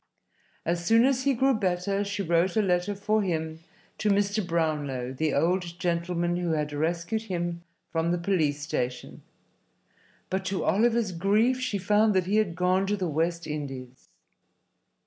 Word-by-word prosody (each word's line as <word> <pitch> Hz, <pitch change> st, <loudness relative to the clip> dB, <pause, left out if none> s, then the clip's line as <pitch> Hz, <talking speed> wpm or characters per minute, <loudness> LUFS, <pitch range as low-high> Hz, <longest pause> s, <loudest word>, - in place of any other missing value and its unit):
As 170 Hz, +1 st, -1 dB
soon 225 Hz, +6 st, +5 dB
as 260 Hz, -1 st, +1 dB
he 275 Hz, -2 st, +3 dB
grew 270 Hz, +3 st, +3 dB
better 195 Hz, -1 st, 0 dB
she 200 Hz, 0 st, -3 dB
wrote 170 Hz, +3 st, +1 dB
a -, -, +5 dB
letter 180 Hz, +2 st, +1 dB
for 215 Hz, +2 st, +1 dB
him 160 Hz, -4 st, -2 dB, 0.4 s
to 215 Hz, -, +1 dB
Mr. 205 Hz, +1 st, +2 dB
Brownlow, 150 Hz, -7 st, -1 dB
the 155 Hz, +3 st, 0 dB
old 175 Hz, +3 st, 0 dB
gentleman 175 Hz, 0 st, -1 dB
who 175 Hz, -2 st, -1 dB
had 150 Hz, -1 st, -1 dB
rescued 170 Hz, +7 st, -1 dB
him 175 Hz, -3 st, -3 dB, 0.3 s
from 165 Hz, 0 st, 0 dB
the 175 Hz, -, +1 dB
police 170 Hz, -5 st, 0 dB
station, 125 Hz, -4 st, -4 dB, 1.1 s
but 190 Hz, +1 st, -1 dB
to 190 Hz, 0 st, -1 dB
Oliver's 225 Hz, 0 st, +2 dB
grief 210 Hz, +8 st, +2 dB
she 255 Hz, -5 st, -1 dB
found 210 Hz, +2 st, +3 dB
that 185 Hz, -2 st, +2 dB
he 200 Hz, +3 st, +1 dB
had 200 Hz, -6 st, +1 dB
gone 185 Hz, +2 st, +2 dB
to 205 Hz, +1 st, 0 dB
the 185 Hz, -2 st, -1 dB
West 170 Hz, +2 st, -1 dB
Indies. 135 Hz, -4 st, -6 dB
180 Hz, 160 wpm, -27 LUFS, 165-205 Hz, 1.1 s, soon